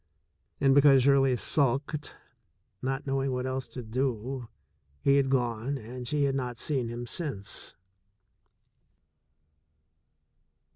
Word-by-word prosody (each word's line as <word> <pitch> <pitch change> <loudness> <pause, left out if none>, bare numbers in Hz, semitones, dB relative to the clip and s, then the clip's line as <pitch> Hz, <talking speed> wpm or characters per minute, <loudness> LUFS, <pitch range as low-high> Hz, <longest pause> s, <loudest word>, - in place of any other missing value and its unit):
And 135 -1 +4
because 135 -2 +6
Shirley 135 -1 +4
sulked, 140 +3 0 0.7
not 135 +2 -2
knowing 135 -1 0
what 125 0 -2
else 130 0 -3
to 125 - -7
do, 125 +1 -2 0.5
he 140 0 +4
had 135 -1 +2
gone 125 +1 0
and 125 +1 -8
she 145 +2 +1
had 140 -1 +2
not 125 -3 -3
seen 130 -3 -1
him 120 +1 -5
since. 120 - -3
135 Hz, 110 wpm, -29 LUFS, 120-140 Hz, 0.7 s, because